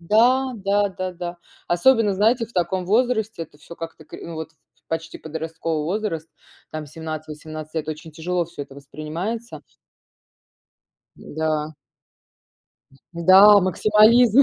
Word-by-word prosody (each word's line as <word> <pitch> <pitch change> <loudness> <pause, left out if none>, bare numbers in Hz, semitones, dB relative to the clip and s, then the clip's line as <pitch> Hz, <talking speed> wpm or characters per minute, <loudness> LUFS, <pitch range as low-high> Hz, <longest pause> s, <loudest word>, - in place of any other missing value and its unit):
да, 245 +8 +3
да-да-да. 185 -4 -2 0.3
Особенно, 210 +3 +3
знаете, 225 +4 +2
в 230 - -21
таком 180 0 0
возрасте 220 -3 +1
это 150 -2 -13
всё 170 +3 -12
как-то 165 -1 -8
кри - - -10
ну, 170 - -7
вот 160 0 -6
ф 160 - -42 0.3
в - - -65
почти 165 0 -4
подростковый 160 0 -4
возраст, 170 -3 -2 0.4
там 155 -1 -5
17-18 155 0 -7
лет 155 -1 -3
очень 155 0 -6
тяжело 175 +2 -1
всё 170 -3 -8
это 140 -1 -12
воспринимается. 165 +11 -6 1.5
М-да. 155 0 -3 1.4
М-да, 190 +4 +8
максимализм, 215 +7 +5
170 Hz, 120 wpm, -22 LUFS, 155-210 Hz, 1.5 s, М-да